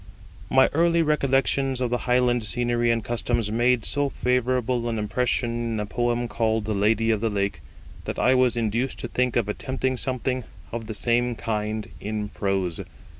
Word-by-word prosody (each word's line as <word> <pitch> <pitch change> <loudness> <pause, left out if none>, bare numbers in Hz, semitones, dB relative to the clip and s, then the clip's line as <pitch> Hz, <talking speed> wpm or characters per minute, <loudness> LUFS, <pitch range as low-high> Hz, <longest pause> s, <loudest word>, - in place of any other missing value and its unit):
My 130 0 +6
early 170 +2 +3
recollections 135 -3 +1
of 125 -2 -1
the 125 - +1
Highland 125 -1 +3
scenery 120 +2 0
and 115 -1 +1
customs 120 -2 -1
made 120 +1 +2
so 145 0 +1
favourable 125 -1 0
an 115 - -2
impression 120 +3 0
in 115 -1 -2
the 105 - -2
poem 120 +2 -1
called 110 -2 0
the 110 - -1
Lady 110 +3 +2
of 110 -2 0
the 115 - +1
Lake, 100 -1 -2 0.4
that - - -4
I 130 - +4
was 125 -2 +3
induced 115 +3 -1
to - - -3
think 125 +1 0
of 115 -4 +1
attempting 130 +4 -2
something 130 0 -1 0.3
of 115 -1 -5
the 110 - -4
same 120 +2 +1
kind 110 -1 -3
in 105 0 -3
prose. 95 -5 -1
120 Hz, 175 wpm, -25 LUFS, 110-125 Hz, 0.4 s, My